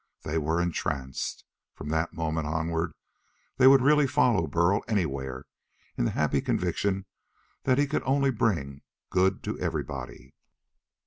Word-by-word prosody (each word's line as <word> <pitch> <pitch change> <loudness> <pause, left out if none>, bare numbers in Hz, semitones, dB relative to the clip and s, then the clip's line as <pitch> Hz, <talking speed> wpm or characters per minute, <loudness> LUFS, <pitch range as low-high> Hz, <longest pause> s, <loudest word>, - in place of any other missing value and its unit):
They 80 +2 -1
were 80 +2 0
entranced. 65 -6 -3 0.3
From 75 - -7
that 80 +2 0
moment 80 -1 -2
onward 80 +2 -2 0.6
they 130 0 +7
would 135 -1 +7
really 150 0 +5
follow 120 - +2
Burl 85 +6 +2
anywhere, 70 - -2 0.5
in - - 0
the - - +1
happy 75 -2 +2
conviction 95 -1 -1 0.6
that 130 - +3
he 145 - +4
could 150 +2 -1
only 135 0 +2
bring 85 - -1 0.3
good 95 +1 +2
to - - -4
everybody. 65 -3 -5
85 Hz, 135 wpm, -27 LUFS, 75-115 Hz, 0.6 s, they